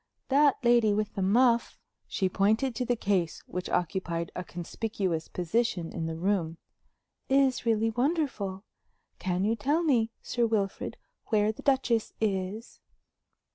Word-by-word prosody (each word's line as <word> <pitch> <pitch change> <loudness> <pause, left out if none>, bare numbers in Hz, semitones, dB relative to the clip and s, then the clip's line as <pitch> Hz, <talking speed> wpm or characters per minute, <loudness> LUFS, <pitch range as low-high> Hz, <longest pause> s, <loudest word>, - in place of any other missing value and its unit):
That 285 +1 +5
lady 235 -3 +4
with 210 0 -1
the 195 - -3
muff" 235 +5 +3 0.3
she 190 - 0
pointed 215 +7 +1
to 250 +2 -2
the 245 - +1
case 195 -7 -1
which 180 0 -5
occupied 170 -2 -1
a 180 - -3
conspicuous 175 -1 -3
position 180 -1 -1
in 165 -2 -3
the 165 - -3
room 170 -2 -1 0.7
"is 265 -3 +2
really 225 0 +2
wonderful. 240 - -1 0.6
Can 180 0 -1
you 225 +2 +2
tell 290 +10 +1
me, 240 -8 +2
Sir 240 -1 +1
Wilfrid, 205 -3 -2 0.3
where 215 -1 +2
the 220 - -11
Duchess 255 -5 +1
is?" 205 +1 -2
215 Hz, 135 wpm, -29 LUFS, 185-240 Hz, 0.7 s, That